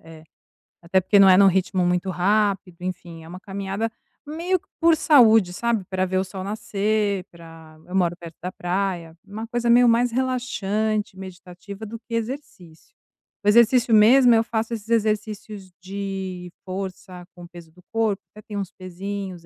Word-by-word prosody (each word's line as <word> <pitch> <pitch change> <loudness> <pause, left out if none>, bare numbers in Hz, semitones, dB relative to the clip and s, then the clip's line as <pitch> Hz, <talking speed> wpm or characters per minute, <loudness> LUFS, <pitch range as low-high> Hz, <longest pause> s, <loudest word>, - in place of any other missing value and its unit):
É. 160 -1 -14 0.6
Até 185 +3 +2
porque 200 +2 +3
não 195 -1 +8
é 185 - +7
num 200 - +7
ritmo 185 -1 +1
muito 180 +2 0
rápido, 195 -1 0
enfim, 175 -3 -7
é - - -13
uma 180 +2 -9
caminhada 200 +2 -4 0.4
meio 340 +5 -1
que - - -37
por 330 -1 +4
saúde, 225 - +5
sabe, 235 0 -1
pra 185 0 -1
ver 185 +1 -1
o 190 - +1
sol 190 0 -7
nascer, 205 -1 -1
pra 165 -2 -14
eu 180 - -7
moro 175 -2 +1
perto 170 -2 -11
da 180 - -4
praia, 175 -3 -3
uma 210 +3 -7
coisa 240 0 -1
meio 240 +1 +6
mais 235 +1 +3
relaxante, 220 -5 -1
meditativa, 190 +2 -10
do 225 +2 -8
que 230 0 -7
exercício. 225 - -7 0.5
O - - -4
exercício 235 +2 +4
mesmo 240 +4 +6
eu 225 - +3
faço 225 0 -3
esses 220 0 -7
exercícios 215 -3 -2
de 190 -2 -6
força 185 -1 -7
com 175 - -11
peso 170 -2 -14
do 180 +3 -20
corpo, 220 -3 0
até 215 - -13
tenho 205 -2 -4
uns 195 - -5
pesinhos, 185 -1 -7
195 Hz, 170 wpm, -23 LUFS, 180-220 Hz, 0.6 s, não